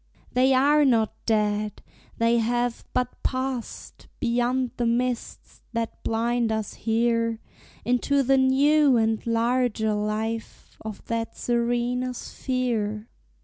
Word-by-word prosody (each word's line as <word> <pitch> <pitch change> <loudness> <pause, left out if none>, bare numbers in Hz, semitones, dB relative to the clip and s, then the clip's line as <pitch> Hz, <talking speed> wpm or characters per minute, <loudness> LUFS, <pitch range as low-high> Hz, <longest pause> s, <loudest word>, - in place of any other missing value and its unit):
They 260 +1 +4
are 290 +3 +4
not 230 -5 +3
dead! 210 -1 0 0.3
they 230 +1 +3
have 240 +1 -1
but 250 0 -2
passed 260 -2 -4
Beyond 245 +1 0
the 240 - 0
mists 245 +1 -2
that 230 -1 -3
blind 230 +1 0
us 220 -2 -2
here 230 0 0 0.5
Into 260 +3 +2
the 270 +1 +3
new 275 +1 +4
and 220 -1 +1
larger 230 -1 +1
life 215 +2 -3
Of 215 -2 -7
that 230 -1 -3
serener 240 +1 0
sphere. 230 -5 -3
235 Hz, 110 wpm, -25 LUFS, 225-255 Hz, 0.5 s, They